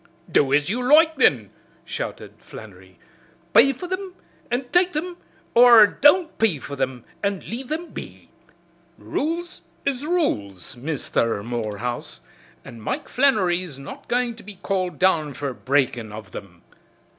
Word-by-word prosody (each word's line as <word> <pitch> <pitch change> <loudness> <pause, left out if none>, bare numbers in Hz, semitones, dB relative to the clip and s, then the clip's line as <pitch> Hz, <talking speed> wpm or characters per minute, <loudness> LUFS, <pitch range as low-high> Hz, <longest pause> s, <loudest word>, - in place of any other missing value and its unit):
"Do 135 -2 +3
as 145 +1 +3
you 235 +6 -1
loike, 315 +5 +5
then!" 120 - +3 0.3
shouted - - -6
Flannery, 95 -4 -13 0.6
"pay 235 +6 +7
for 275 +7 -7
thim 370 0 -5 0.3
an' 250 +2 -1
take 355 0 +3
thim, 345 +4 -4 0.4
or 235 -2 +8
don't 315 - +3
pay 215 -8 +3
for 140 +1 -8
thim 130 -3 -3 0.2
and 200 -2 -1
leave 245 +3 -5
thim 325 +3 -4
be. - - -10 0.7
Rules 340 +3 -3 0.2
is 275 -1 -1
rules, 105 - -2
Misther 120 -6 -1
Morehouse, 120 0 -4 0.5
an' 115 -1 -11
Mike - - -4
Flannery's 185 - +1
not 135 0 -10
goin' 245 -1 0
to - - -11
be 205 0 -8
called 185 -1 -2
down 160 -6 +2
fer 140 -2 -4
breakin' 125 -4 0
of 105 -1 -9
thim." 90 -4 -11
185 Hz, 140 wpm, -23 LUFS, -, 0.7 s, or